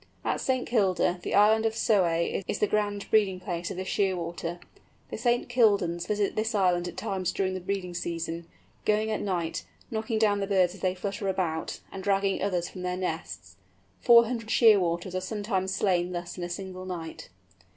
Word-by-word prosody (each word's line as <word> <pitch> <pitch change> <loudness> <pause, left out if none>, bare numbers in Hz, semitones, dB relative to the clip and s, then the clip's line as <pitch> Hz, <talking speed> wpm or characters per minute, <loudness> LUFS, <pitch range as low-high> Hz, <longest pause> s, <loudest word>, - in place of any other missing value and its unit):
At - - 0
St. 255 -1 0
Kilda 190 -5 +1
the - - -2
island 215 +2 +5
of 225 -1 +1
Soay 185 -5 +1
is - - -1
the - - +2
grand 205 -1 -1
breeding 200 -4 +3
place 175 -1 -4
of - - -6
this 185 0 -4
Shearwater. 175 -3 -1 0.5
The - - -4
St. 240 0 +1
Kildans 200 -8 +2
visit 210 -1 0
this 220 +1 -1
island 180 -3 +2
at 175 - -8
times 185 -2 -2
during 190 0 -1
the 185 - -3
breeding 185 -1 -3
season, 170 -1 -4 0.4
going 215 +1 +1
at 215 - -1
night, 175 -4 -2 0.3
knocking 220 0 -1
down 210 -2 +3
the 195 - -2
birds 185 -3 +3
as 190 - -13
they 185 0 +1
flutter 195 +1 -4
about, 180 -4 -2
and 190 - -7
dragging 195 0 +1
others 180 -3 0
from 185 - -9
their 180 0 -2
nests. 95 - -5 0.4
Four 235 -1 +7
hundred 230 -2 -4
Shearwaters 185 -6 +4
are 185 - -1
sometimes 195 -1 -2
slain 180 -2 +1
thus 175 0 -5
in 180 - -5
a 175 - -4
single 185 0 -6
night. 165 -3 -6
190 Hz, 185 wpm, -28 LUFS, 175-210 Hz, 0.5 s, Four